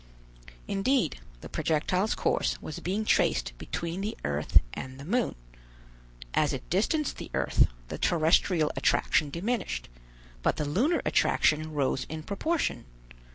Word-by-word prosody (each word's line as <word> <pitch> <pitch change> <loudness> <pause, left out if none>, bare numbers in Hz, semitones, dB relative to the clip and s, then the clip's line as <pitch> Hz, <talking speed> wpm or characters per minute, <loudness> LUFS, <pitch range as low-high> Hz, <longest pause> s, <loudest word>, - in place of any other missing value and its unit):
Indeed, 225 - +1 0.2
the - - -8
projectile's 180 +6 0
course - - 0
was 155 - -6
being 200 +5 -2
traced - - +2
between 170 +3 -4
the 210 +2 -3
earth 75 +1 +3
and 130 0 -7
the 140 - -8
moon. 240 +8 0 1.0
As 150 -2 +2
it 130 -1 -5
distanced 270 - +1
the - - -7
earth, - - +3 0.2
the - - -5
terrestrial 160 -1 +3
attraction 150 - +2
diminished: 170 - -2 0.5
but - - +2
the 150 - -1
lunar 240 - +1
attraction 155 0 +2
rose 135 -2 0
in 155 0 -5
proportion. 205 - -1
165 Hz, 130 wpm, -28 LUFS, 145-210 Hz, 1.0 s, earth